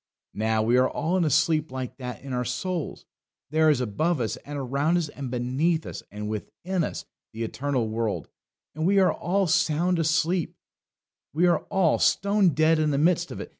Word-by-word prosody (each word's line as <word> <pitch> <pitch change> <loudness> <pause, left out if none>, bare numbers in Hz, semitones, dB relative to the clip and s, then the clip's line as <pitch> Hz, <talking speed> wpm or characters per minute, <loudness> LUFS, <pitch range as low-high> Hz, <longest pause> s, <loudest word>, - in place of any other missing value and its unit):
Now, 110 0 0
we 120 +3 +3
are 130 0 +4
all 170 +3 -1
in 175 - +2
a - - +2
sleep 155 0 +2
like 130 -1 -5
that 125 -1 -7
in 135 -2 -6
our 125 0 0
souls. 155 +6 -4 0.5
There 155 0 +4
is 145 -4 +3
above 150 +8 0
us, 110 -1 -1
and 145 +3 -8
around 140 +5 0
us, 165 -4 -1
and 140 -3 -6
beneath 130 +7 0
us, - - -6
and 105 +1 -6
within 170 - -3
us - - -4 0.3
the 115 +1 -4
eternal 130 0 -1
world, 110 -1 -2 0.5
and 155 +3 -1
we 200 +1 +3
are 190 -1 +4
all 195 +2 0
sound 175 0 +2
asleep; 160 +1 +1 0.8
we 165 +4 +2
are 175 - +4
all 190 -6 +2
stone 200 -5 +3
dead 155 +1 +3
in 155 -1 +2
the 140 - 0
midst 165 +4 +2
of - - -7
it. - - -7
155 Hz, 195 wpm, -26 LUFS, 125-170 Hz, 0.8 s, are